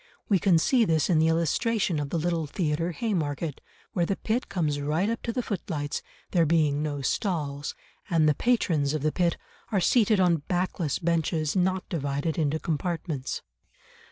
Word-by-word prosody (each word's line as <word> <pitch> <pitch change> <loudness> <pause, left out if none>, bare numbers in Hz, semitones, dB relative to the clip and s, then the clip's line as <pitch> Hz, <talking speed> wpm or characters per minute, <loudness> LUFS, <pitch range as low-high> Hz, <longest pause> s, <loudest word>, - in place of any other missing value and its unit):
We 195 -3 +4
can 180 -2 +4
see 240 +9 +3
this 160 -3 +2
in 160 - +4
the 160 - +4
illustration 170 - +1
of 145 -1 -3
the 170 - -1
Little 165 -1 0
Theatre, 165 +1 -1
Haymarket, 160 - -2 0.3
where 175 -2 +1
the 195 - 0
pit 225 +6 -2
comes 155 -7 -1
right 155 +7 0
up 230 +1 -2
to 230 - -2
the 250 +1 -2
footlights, 155 -9 -3 0.3
there 170 -4 +3
being 150 -3 +2
no 145 -2 -3
stalls, 145 -4 -2 0.3
and 165 -4 +3
the 150 - +5
patrons 155 - +1
of 150 - -3
the 155 - +2
pit 175 -1 +1 0.3
are 200 - +2
seated 215 +2 +3
on 175 -3 +4
backless 175 -4 -1
benches 165 -2 0
not 185 0 +1
divided 145 +1 -2
into 155 0 +1
compartments. 160 -3 -3
165 Hz, 170 wpm, -27 LUFS, 150-185 Hz, 0.3 s, the